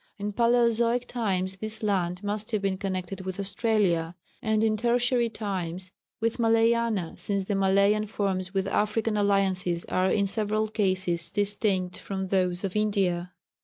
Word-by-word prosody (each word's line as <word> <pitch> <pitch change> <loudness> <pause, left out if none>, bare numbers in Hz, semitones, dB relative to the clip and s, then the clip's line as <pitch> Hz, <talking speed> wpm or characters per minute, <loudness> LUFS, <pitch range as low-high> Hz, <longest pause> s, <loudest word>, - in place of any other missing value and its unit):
In 205 0 -4
Palæozoic 235 +1 +3
times 190 -5 -2
this 215 +2 -5
land 185 -2 0
must 205 +1 -3
have 215 -3 0
been 190 -1 0
connected 190 -1 -3
with 185 +1 -5
Australia, 195 -5 0 0.3
and 220 0 +1
in 220 -1 +2
Tertiary 240 +1 +2
times 185 -4 -4 0.3
with 230 +1 -1
Malayana, 225 -4 +2
since 200 -1 -1
the 205 - -2
Malayan 200 +2 +3
forms 190 -3 -2
with 195 -1 0
African 215 +2 0
alliances 190 -4 +1
are 185 +1 +1
in 200 0 +2
several 215 +1 0
cases 185 -5 0
distinct 200 -2 0
from 190 -1 -4
those 180 -1 +1
of 195 -1 -3
India. 190 -4 0
200 Hz, 145 wpm, -27 LUFS, 185-220 Hz, 0.3 s, Palæozoic